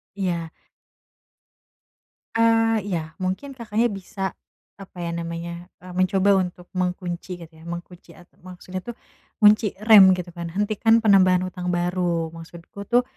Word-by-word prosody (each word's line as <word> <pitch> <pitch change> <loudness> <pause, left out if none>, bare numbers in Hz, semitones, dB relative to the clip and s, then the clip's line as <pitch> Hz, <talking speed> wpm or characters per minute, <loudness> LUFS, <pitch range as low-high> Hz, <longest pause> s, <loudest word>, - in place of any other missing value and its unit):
Iya. 175 -4 -2 1.8
Eee, 225 -1 +3
iya, 160 -4 -3
mungkin 190 +10 -3
Kakaknya 230 -1 0
bisa, 195 0 -5 0.5
apa 185 -1 -13
ya 170 - -3
namanya, 170 +1 -6
eee, 180 -1 -10
mencoba 190 +1 +3
untuk 180 -1 -6
mengunci 180 0 -3
gitu 165 -1 -12
ya, - - -15
mengunci 175 +1 -9
ata 175 - -19
maksudnya 185 0 -8
tuh, 240 +2 -8 0.5
ngunci 210 0 +5
rem 200 -4 +8
gitu 180 -1 -7
kan, 170 -1 -6
hentikan 215 +4 +2
penambahan 185 -3 +5
hutang 180 -1 -5
baru. 175 -2 -1
Maksudku 170 +4 -11
tuh, 245 +1 +4
185 Hz, 130 wpm, -23 LUFS, 175-205 Hz, 1.8 s, rem